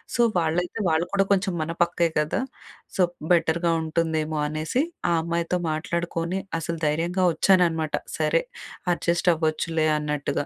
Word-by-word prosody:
So, - - -4 0.2
వాళ్ళైతే 175 +5 0
వాళ్ళు 160 +2 +2
కూడా 195 -1 +3
కొంచెం 190 -1 +2
మన 165 +2 -2
పక్కే 170 0 +1
గదా! 150 +10 0 0.6
సో 185 - +5 0.3
బెటర్‌గా 170 0 +3
ఉంటుందేమో, 160 -1 -1
అనేసి 155 - -1 0.3
ఆ - - +3
అమ్మాయితో 170 +2 -1
మాట్లాడుకొని 170 +2 -2 0.2
అసలు 165 0 -4
ధైర్యంగా 170 +5 +1
వచ్చాననమాట. 165 -3 +3 0.2
సరే, - - +2 0.5
అడ్జస్ట్ 175 +1 +1
అవ్వచ్చులే 160 0 0
అన్నట్టుగా. 150 -1 -2
165 Hz, 125 wpm, -25 LUFS, 155-175 Hz, 0.6 s, సో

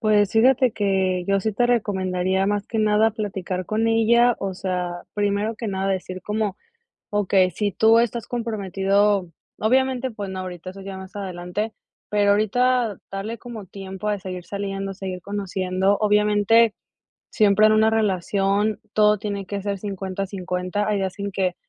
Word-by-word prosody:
Pues, 210 -3 +3
fíjate 250 +2 +4
que 190 -3 0
yo 195 0 +2
sí 220 +3 -1
te 240 +4 +2
recomendaría 190 -5 0
más 205 0 -1
que 225 - -2
nada, 215 +1 +3
platicar 190 -4 -4
con 220 +1 0
ella, 235 +2 +4
o 195 -1 -3
sea, 180 -2 -3
primero 205 +2 0
que 235 - -5
nada 195 -1 -1
decir 185 -1 -4
como, 210 -1 -2 0.6
okey, 195 -2 +3
si 205 +1 -1
tú 220 +4 +5
estás 235 -1 -1
comprometido, 200 -4 0 0.3
obviamente, 260 +2 +1
pues 205 -3 -6
no 190 0 -5
ahorita, 185 -1 -6
eso 195 +1 -11
ya 195 0 -7
más 190 +1 -11
adelante, 190 +2 -4 0.4
pero, 205 -1 +3
ahorita 230 +1 +2
darle 205 +4 -5
como 225 -3 -9
tiempo 195 +2 -6
de 205 -1 -1
seguir 185 -1 -6
saliendo, 195 0 -4
seguir 185 -2 -6
conociendo, 190 0 0
obviamente, 210 +1 +4 0.5
siempre 215 0 +4
en 215 - +5
una 220 0 +4
relación, 200 0 +1
todo 210 0 +4
tiene 200 -1 -4
que 200 +1 -4
ser 200 0 -2
50 195 -1 -4
50 185 +1 -3
hay 210 - +1
días 190 0 -3
en 200 0 -4
que, 185 -1 0
200 Hz, 160 wpm, -23 LUFS, 190-215 Hz, 0.6 s, tú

